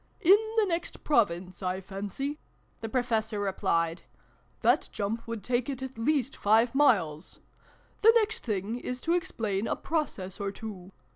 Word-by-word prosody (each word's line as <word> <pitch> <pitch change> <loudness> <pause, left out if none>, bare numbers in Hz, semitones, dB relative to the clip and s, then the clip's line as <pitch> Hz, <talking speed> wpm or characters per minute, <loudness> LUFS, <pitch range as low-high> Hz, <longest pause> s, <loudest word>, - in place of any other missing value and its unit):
"In 380 +1 +8 0.2
the 440 - +5
next 340 -2 -3
Province, 185 - +1
I 185 0 -1
fancy," 205 +10 -5 0.4
the 225 - -5
Pro 250 +2 +1
fessor 220 -3 -1
replied. 170 -4 0 0.3
" - - -36
That - - +3
jump 220 +3 -3
would 230 -3 -5
take 245 +1 0
it 265 -1 -4
at 265 0 -6
least 265 +2 0
five 225 +3 +3
miles! 190 - +2 0.6
The 450 - +8
next 435 -2 +2
thing 215 +1 -2
is 250 0 -4
to 335 - +1
ex 350 -1 0
plain 210 -1 -2
a - - 0
Process 200 - -3
or 200 -1 -1
two. 195 -3 -8
225 Hz, 165 wpm, -29 LUFS, 195-275 Hz, 0.6 s, In